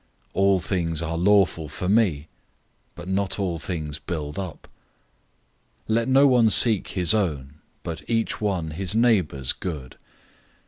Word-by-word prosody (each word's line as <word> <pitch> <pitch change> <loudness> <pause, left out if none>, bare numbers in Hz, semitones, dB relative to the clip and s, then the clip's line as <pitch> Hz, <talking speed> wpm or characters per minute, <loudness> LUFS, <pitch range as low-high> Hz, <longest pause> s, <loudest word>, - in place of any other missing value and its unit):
"All 100 0 +3
things 85 -3 -2
are 85 0 -3
lawful 90 -3 +2
for 90 - -5
me," 95 -8 +1 0.7
but 85 +1 -10
not 95 0 -1
all 90 -5 -2
things 75 -4 -5
build 75 0 -5
up. 95 -4 -7 1.2
010:024 110 - 0
Let 115 0 0
no 135 +2 +5
one 125 -5 +4
seek 110 -1 +5
his 90 +1 +2
own, 75 -9 -2 0.2
but 85 -1 -7
each 115 -1 -1
one 90 -7 -2
his 95 +5 -2
neighbor's 95 - +1
good. 75 -8 -7
90 Hz, 140 wpm, -23 LUFS, 80-105 Hz, 1.2 s, no